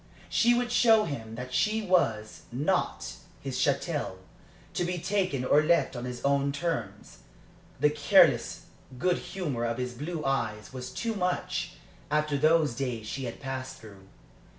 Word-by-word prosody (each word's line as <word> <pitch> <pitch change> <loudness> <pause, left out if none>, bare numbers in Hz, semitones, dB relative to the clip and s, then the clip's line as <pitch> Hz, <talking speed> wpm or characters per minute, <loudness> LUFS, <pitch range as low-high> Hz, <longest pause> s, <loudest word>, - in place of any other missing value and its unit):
She 240 +1 +4
would 245 0 0
show 225 -3 +5
him 115 - -5
that 125 +1 -7
she 215 +10 +1
was 115 - +1
not 135 - -1 0.2
his 130 -2 -4
chattel, 140 - 0 0.6
to 175 - 0
be 175 +1 -1
taken 185 -7 0
or 145 +3 +5
left 165 -2 +2
on 120 0 -4
his 125 0 -5
own 140 0 +2
terms. 140 - -4 0.6
The, 150 +2 +4
careless 145 -1 +4 0.3
good 180 +6 +1
humor 175 -9 -3
of 115 0 -1
his 125 -1 -3
blue 155 +5 -5
eyes 115 -5 -1
was 125 -1 -6
too 230 -1 -3
much, 180 -2 -2 0.4
after 150 0 +1
those 155 -1 +3
days 120 -3 -3
she 130 +4 -4
had 115 - -6
passed 130 -1 -5
through. 100 -3 -14
140 Hz, 150 wpm, -28 LUFS, 125-175 Hz, 0.6 s, show